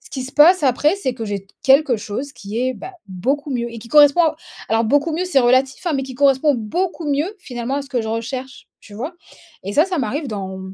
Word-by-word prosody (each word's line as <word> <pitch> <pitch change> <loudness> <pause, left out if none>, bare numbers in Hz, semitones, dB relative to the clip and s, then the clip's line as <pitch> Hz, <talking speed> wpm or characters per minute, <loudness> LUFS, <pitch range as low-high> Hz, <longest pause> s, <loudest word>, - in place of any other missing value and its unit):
ce - - -18
qui 265 - -4
se 260 - -9
passe 330 +4 +6
après, 295 +6 +2
c'est 265 -10 -2
que 230 -2 -5
j'ai 200 -1 -4 0.2
quelque 270 -2 +4
chose 245 +7 -5
qui 205 -2 -6
est 255 +1 0
bah, 380 - -9 0.2
beaucoup 270 - -2
mieux 240 -2 -2
et 230 - -8
qui 230 +1 -12
correspond 295 +5 +6
à 315 -2 +1 0.3
alors 225 +1 +2
beaucoup 290 +8 +1
mieux, 340 +4 -1
c'est 360 -7 +2
relatif 260 +4 +2
hein, 340 - +1
mais 270 - -1
qui 260 -1 -7
correspond 280 +2 +3
beaucoup 335 - -3
mieux, 300 +9 -1
finalement, 250 -5 -5
à 285 - -2
ce 275 - -13
que 250 -3 0
je 220 - -5
recherche, 255 +4 -5
tu 205 - -14
vois? 260 - -5 0.5
Et 200 - -4
ça, 305 - +5
ça 370 -3 -2
m'arrive 280 +4 -2
dans 190 -3 -5
265 Hz, 240 wpm, -20 LUFS, 230-295 Hz, 0.5 s, passe